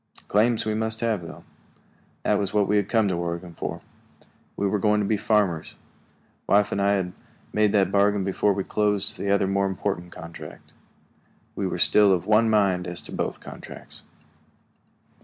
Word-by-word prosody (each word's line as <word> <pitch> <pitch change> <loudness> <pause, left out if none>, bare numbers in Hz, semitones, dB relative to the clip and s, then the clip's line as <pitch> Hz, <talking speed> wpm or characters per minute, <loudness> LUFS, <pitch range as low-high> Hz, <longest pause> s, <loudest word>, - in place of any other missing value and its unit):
Claims 110 +2 +2
we 110 - 0
must 110 +1 -2
have, 115 -5 0
though. 85 - -10 0.8
That - - +2
was 100 +1 -2
what 105 -2 +3
we 105 - +2
had 100 -1 0
come 110 -3 +3
to 95 - 0
Oregon 85 0 -4
for. - - -5 0.8
We 100 - 0
were 105 +1 0
going 105 +1 +2
to 105 - 0
be 110 - +1
farmers; 100 -6 0 0.7
wife 105 0 +3
and 100 - -1
I 100 +1 +3
had 90 -2 -1 0.4
made 105 -1 +3
that 95 -2 +3
bargain 100 0 +3
before 100 +2 +1
we 95 0 -2
closed 105 -1 0
the 100 - -2
other 100 0 +3
more 100 0 +1
important 95 -2 -3
contract. 85 +1 -11 0.8
We - - -1
were - - -3
still 105 -2 +5
of 90 - -1
one 110 +1 +4
mind 95 -4 +2
as 85 0 -2
to - - -12
both - - -3
contracts. - - -11
100 Hz, 175 wpm, -25 LUFS, 95-105 Hz, 0.8 s, still